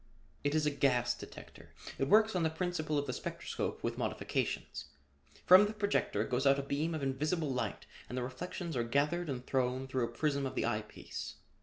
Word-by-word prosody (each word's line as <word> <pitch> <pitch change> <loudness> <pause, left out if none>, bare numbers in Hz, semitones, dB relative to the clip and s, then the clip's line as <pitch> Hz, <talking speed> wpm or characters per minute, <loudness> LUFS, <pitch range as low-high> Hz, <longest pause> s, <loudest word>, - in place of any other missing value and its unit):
"It 145 +1 +1
is 155 -1 +2
a 150 - +3
gas 125 -4 +2
detector. - - -11 0.3
It 135 - +1
works 220 +1 +5
on 180 - +2
the 160 - +3
principle 160 -2 -1
of 145 - 0
the 125 - -3
spectroscope - - -4
with - - -2
modifications. - - -2 0.6
From 190 +3 +9
this 215 - -6
projector 200 - +1
goes 130 +3 +1
out 135 0 +6
a 140 - -2
beam 150 +4 -1
of 155 - -3
invisible 150 +3 0
light 125 - -3 0.2
and 125 - -4
the 125 - 0
reflections 170 +5 -5
are 120 - +1
gathered 150 +8 +1
and 125 -2 -4
thrown 130 0 0
through 130 -2 0
a 115 - -7
prism 140 +3 0
of 130 - -7
the - - +1
eye 110 -2 0
piece. 105 - -7
140 Hz, 200 wpm, -33 LUFS, 130-160 Hz, 0.6 s, From